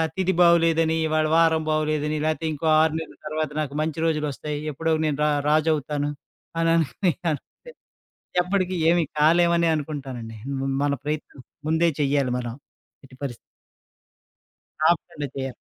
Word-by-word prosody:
తిధి 190 0 +1
బాగాలేదని, 165 -2 +4
ఇవాళ 155 0 +1
వారం 165 -1 +4
బాగాలేదని, 155 0 0
లాకపోతే 155 +1 -1
ఇంకో 150 +2 -5 0.2
6 160 -1 +2
నెలల 160 - -8
తర్వాత 155 0 -2
నాకు 145 -2 -2
మంచి 160 +1 -2
రోజులొస్తాయి. 150 -1 -2
ఎప్పుడో 160 +3 -1
నేను 150 -2 0
రా 150 - +3 0.2
రాజు 155 +1 +3
అవుతాను 145 0 -2 0.5
అని 165 0 +2
అనోకోనికన్ 165 0 0 1.0
ఎప్పటికి, 185 0 -1
ఏమి 170 0 +4 0.2
కాలేమనే 170 +2 +4
అనుకుంటానండి. 135 -7 -5 0.2
మ - - -3 0.2
మన 145 0 +1
ప్రయత్నం 150 -2 -5 0.3
ముందే 160 +2 +3
చెయ్యాలి 140 -2 +1
మనం 120 -2 -4 0.5
ఎట్టిపరిస్థితి. 130 -2 -7 1.5
ఆపకుండా 155 -3 -1
చెయ్యాలి. 135 -2 -4
155 Hz, 125 wpm, -24 LUFS, 145-165 Hz, 1.5 s, బాగాలేదని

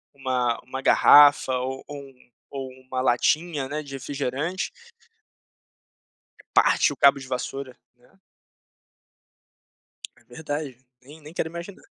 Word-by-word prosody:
uma 125 -3 -1
uma 130 +1 -7
garrafa 145 -2 +6
ou 130 +1 -5
ou 145 - -8
um 130 -2 -19 0.2
ou 135 -1 -6 0.2
uma 130 -1 -2
latinha, 145 +4 +1
né, 150 +1 -3
de 140 -2 -11
refrigerante. 140 +6 -4 1.8
Parte - - +3
o - - -15
cabo 140 0 +5
de 130 -1 -9
vassoura, 130 +1 -5 0.2
né. 125 +10 -27 2.0
É - - -25
verdade, 145 -1 -6 0.3
nem 150 +4 -14
nem 150 +2 -13
quero 160 - -2
imaginar. 170 +3 -9
135 Hz, 120 wpm, -24 LUFS, 130-150 Hz, 2.0 s, garrafa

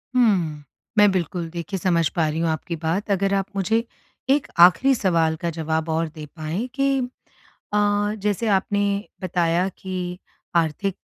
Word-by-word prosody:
हुँ। 180 -11 +2 0.3
मैं 210 0 +7
बिल्कुल 175 -2 -2
देखिए 175 +4 -4
समझ 170 -3 +2
पा 165 -3 +2
रही 155 +1 -2
हूँ 165 -1 +1
आपकी 160 +2 -3
बात। 170 +6 -2
अगर 195 0 +1
आप 195 -1 +1
मुझे 220 +4 +1 0.5
एक 280 +1 +3 0.2
आखरी 265 +9 +2
सवाल 165 -7 +2
का 170 - 0
जवाब 160 0 -1
और 160 +1 0
दे 155 -1 -7
पाएँ, 165 +9 -3
कि 275 0 +2 0.8
अ, - - +3 0.5
जैसे 210 +2 0
आपने 205 0 +1 0.4
बताया 175 0 +1
कि 180 -1 -5 0.4
आर्थिक 170 +4 +1
180 Hz, 150 wpm, -23 LUFS, 165-200 Hz, 0.8 s, मैं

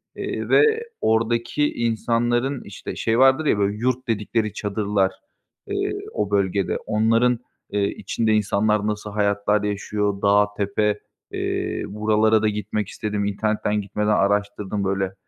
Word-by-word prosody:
eee, - - -4
ve 445 +1 +4 0.2
oradaki 115 +6 +1
insanların, 120 +3 0
işte, 100 - -8
şey 115 +1 0
vardır 135 +4 +5
ya 125 - +3
böyle, 100 +1 0
yurt 130 +3 -1
dedikleri 110 -1 -1
çadırlar, 100 -2 0 0.6
eee, - - -1 0.2
o 105 -1 -2
bölgede. 100 -1 +1
Onların, 115 +3 +2 0.3
eee, 100 -1 +1
içinde 110 +1 -1
insanlar 105 0 +1
nasıl 105 0 -3
hayatlar 100 0 +1
yaşıyor? 105 0 -2
Dağ, 105 0 +4
tepe, 105 +1 0 0.3
eee, - - -2
buralara 110 +1 +2
da 110 - +2
gitmek 105 0 -3
istedim. 105 -1 -3
İnternetten 105 +1 0
gitmeden 105 +1 -3
araştırdım 100 0 0
böyle. 95 0 -1
105 Hz, 130 wpm, -23 LUFS, 100-115 Hz, 0.6 s, vardır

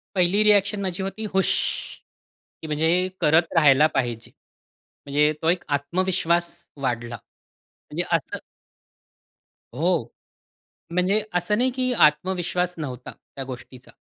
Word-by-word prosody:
पहिली 185 +3 +3
रिॲक्शन 205 -1 +3
माझी 190 0 -3
होती 195 +3 -5
हूश! 190 0 +2 1.1
की 160 - -7
म्हणजे 165 +5 +1
करत 160 +2 +4
राहायला 150 -1 +6
पाहिजे. 120 -3 -2 0.7
म्हणजे 150 +2 +2
तो 160 - +2
एक 180 +1 +1
आत्मविश्वास 175 +2 0 0.3
वाढला. 120 -2 -2
म्हणजे - - -21 0.6
असं - - -7 1.4
हो. 165 +1 +1 0.9
म्हणजे 185 +4 +2
असं 180 +5 +1
नाही 255 +1 +2
की 255 -1 0
आत्मविश्वास 180 0 +2
नव्हता 130 -5 -6
त्या 135 - -10
गोष्टीचा. 130 -1 -10
170 Hz, 110 wpm, -24 LUFS, 145-190 Hz, 1.4 s, राहायला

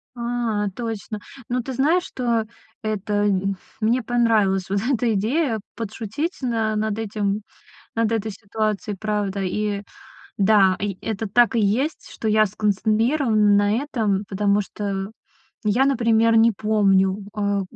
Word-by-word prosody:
А, 235 -3 -1
точно. 220 -4 -4 0.3
Ну 250 0 0
ты 265 +2 -6
знаешь, 320 +8 +2
что 235 -9 -1 0.4
это 215 -1 -2
м 195 -1 0 0.2
мне 235 +3 +2
понравилась 215 -6 +2
вот 200 +1 +1
эта 235 -1 +1
идея: 225 +4 0 0.2
подшутить 230 - -4
на 225 -3 0
над 215 0 -1
этим, 210 -1 -1 0.5
над 230 -1 +1
этой 220 -1 -1
ситуацией, 210 0 -3
правда. 205 -2 -2
И 205 +2 -1 0.6
да, 195 -2 +5
и 195 -2 -3
это 220 0 -3
так 240 +4 +3
и - - +3
есть, 235 +10 0
что 220 - -4
я 215 0 +4
сконцентрирована 215 +2 +2
на 205 0 +3
этом, 220 -8 -1
потому 205 +1 +2
что 195 -1 -4 0.5
я, 225 +6 +3
например, 230 -3 +3
не 230 +1 +6
помню, 195 -2 +2 0.2
э, 200 -1 +1
215 Hz, 135 wpm, -22 LUFS, 200-230 Hz, 0.6 s, не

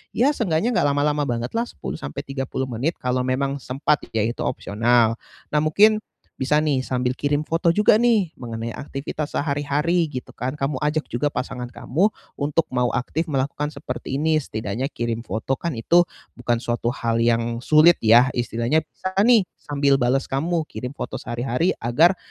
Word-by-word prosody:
ya 260 +5 +4
seenggaknya 190 0 +1
nggak 145 - +3
lama-lama 145 +1 +1
banget 120 -1 -2
lah. 235 - +1
10 - - -6
sampai 70 - -5
30 135 -1 -3
menit. 130 +8 -1
Kalau 125 0 0
memang 135 +2 0
sempat 140 +3 0
ya, 110 - +1
itu 115 +2 -3
opsional. 115 +2 +2 0.4
Nah - - +3
mungkin 210 +8 +5 0.4
bisa 135 +3 +2
nih 150 -4 +1
sambil 125 -1 -1
kirim 145 +2 0
foto 165 +2 +1
juga 210 +5 +5
nih 215 -9 +2
mengenai 115 -2 -5
aktivitas 145 +2 -5
sehari-hari 150 +4 0
gitu 125 - -6
kan. 130 +1 -3
Kamu 135 0 -2
ajak 150 +1 0
juga 145 +5 0
pasangan 125 -1 -4
kamu 165 - 0 0.3
untuk 150 +3 +1
mau 125 -1 +2
aktif 160 +6 -2
melakukan 145 +1 -1
seperti 140 -1 -5
ini. 155 +1 +2
Setidaknya 110 +1 -3
kirim 115 -4 -3
foto, 110 +4 -2
kan 170 -8 -3
itu 170 +10 +4 0.3
bukan 120 -1 -1
suatu 120 0 -1
hal 115 0 -1
yang 115 0 +1
sulit 155 +4 +6
ya. 115 +3 +7
Istilahnya 120 +5 0
bisa 185 +4 -6
nih 225 -2 +5
sambil 140 -1 +1
bales 130 +2 +2
kamu 160 +4 -1
kirim 125 0 -6
foto - - -5
sehari-hari 125 +7 -1
agar 160 +11 +3
135 Hz, 165 wpm, -23 LUFS, 120-155 Hz, 0.4 s, ya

